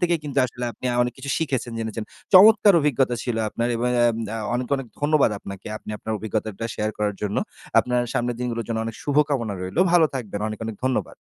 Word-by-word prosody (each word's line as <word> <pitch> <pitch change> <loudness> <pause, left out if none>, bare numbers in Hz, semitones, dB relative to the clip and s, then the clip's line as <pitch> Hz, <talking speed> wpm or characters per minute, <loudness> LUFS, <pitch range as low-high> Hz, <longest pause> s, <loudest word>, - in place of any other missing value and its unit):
থেকেই 175 -1 +2
কিন্তু 140 -1 -2
আসলে 125 +1 -6
আপনি 110 - -15
আ - - -2
অনেক 125 0 -1
কিছু 135 +1 -5
শিখেছেন, 130 -7 -2
জেনেছেন। 110 -1 -4 0.3
চমৎকার 210 +1 +8
অভিজ্ঞতা 135 -4 +2
ছিল 120 -3 -2
আপনার! 115 +3 -2
এবং 120 +2 0
অ্যাম 120 -1 +4 0.2
আ - - -3 0.2
অনেক, 125 +1 -1
অনেক 135 -2 -6
ধন্যবাদ 145 -3 +3
আপনাকে। 100 -1 -9
আপনি 110 - -9
আপনার 110 - -4
অভিজ্ঞতাটা 110 0 -3
শেয়ার 105 0 -1
করার 105 -1 0
জন্য। 105 0 -1 0.4
আপনার 125 0 +2
সামনের 120 0 -1
দিনগুলোর 120 -2 -2
জন্য 115 -1 -1
অনেক 115 -1 -5
শুভকামনা 140 -7 +1
রইলো। 95 - -1
ভালো 170 -2 +6
থাকবেন। 105 -6 -4
অনেক, 110 - -6
অনেক 110 -1 -5
ধন্যবাদ। 130 -1 -1
120 Hz, 200 wpm, -23 LUFS, 110-140 Hz, 0.4 s, চমৎকার